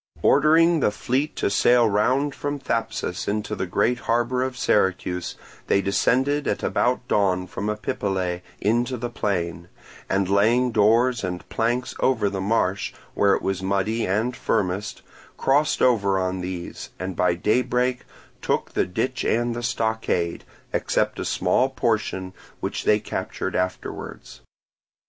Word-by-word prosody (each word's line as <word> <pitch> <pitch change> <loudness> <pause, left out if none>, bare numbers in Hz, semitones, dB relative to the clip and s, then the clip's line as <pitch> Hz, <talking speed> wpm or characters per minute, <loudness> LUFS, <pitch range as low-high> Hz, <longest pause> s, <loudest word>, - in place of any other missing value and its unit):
Ordering 165 +2 +5
the 130 - +3
fleet 130 +8 -1
to - - 0
sail 120 +3 +4
round 130 +8 +1
from 145 +1 -3
Thapsus 115 -8 -3
into 105 0 -2
the 95 - -3
great 120 +7 +1
harbour 120 +2 0
of 130 0 -2
Syracuse, 90 -5 0 0.3
they - - +3
descended 130 +9 +1
at - - -1
about 125 0 0
dawn 95 -5 +2
from 100 +3 -4
Epipolae 95 -4 -2 0.2
into 120 +5 +1
the 120 +1 -4
plain, 85 -6 -2 0.4
and 95 0 +1
laying 115 +6 +3
doors 115 +3 +3
and 90 -1 -4
planks 120 +3 -1
over 110 -6 +2
the 95 -1 -3
marsh, 100 -2 0 0.2
where 100 -1 +3
it - - -5
was 95 -1 -1
muddy 100 +4 0
and 110 +6 0
firmest, 100 -2 -2 0.3
crossed 145 +3 +2
over 100 -6 +3
on 95 0 -1
these, 90 -1 -6
and 95 0 -4
by 90 0 +2
daybreak 125 +5 +1 0.4
took - - -1
the - - 0
ditch 125 +7 -2
and 120 +1 +1
the 120 - -4
stockade, 110 -7 -1 0.3
except - - 0
a - - -3
small 130 - +2
portion 110 -7 -1 0.3
which - - -4
they 105 - +4
captured - - -4
afterwards. 90 0 -4
110 Hz, 140 wpm, -24 LUFS, 95-125 Hz, 0.4 s, Ordering